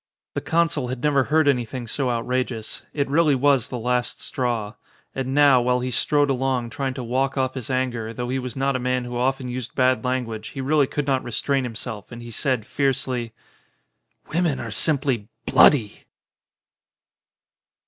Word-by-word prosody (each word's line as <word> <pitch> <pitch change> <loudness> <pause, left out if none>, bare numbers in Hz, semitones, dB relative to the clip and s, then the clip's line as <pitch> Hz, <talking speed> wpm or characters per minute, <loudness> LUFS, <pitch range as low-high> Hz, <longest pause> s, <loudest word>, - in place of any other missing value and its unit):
The - - -2
consul 165 -5 +1
had 125 0 -5
never 140 -3 +3
heard 155 -1 +3
anything 125 -2 0
so 130 +3 0
out 115 -1 -1
rageous. 125 -3 -2
It 140 -2 -1
really 150 0 +3
was 135 -2 +3
the 125 - -5
last 125 +1 -1
straw. 115 -5 -2 0.4
And 135 0 -3
now 140 -3 +6
while 125 +1 +2
he 125 +1 -3
strode 145 +3 +2
along, 130 -2 -1
trying 135 0 -3
to 130 - -4
walk 130 +4 0
off 130 -1 0
his 130 -3 -6
anger, 125 -4 -1
though 120 +1 -4
he 130 +1 0
was 125 -2 -6
not 135 0 0
a - - 0
man 125 0 0
who 120 0 -6
often 130 +1 0
used 125 -1 -5
bad 130 0 +3
language 120 -4 -2
he - - -2
really 140 +1 +2
could 145 +1 -2
not 135 -2 +1
restrain 130 +3 0
himself, 115 -2 -6
and 120 0 -8
he 120 - -8
said 125 -2 0
fiercely: 130 -2 -1 1.0
"Women 165 -4 +1
are 115 - -5
simply 130 -2 +1 0.2
bloody." 115 -8 +4
130 Hz, 175 wpm, -23 LUFS, 120-135 Hz, 1.0 s, now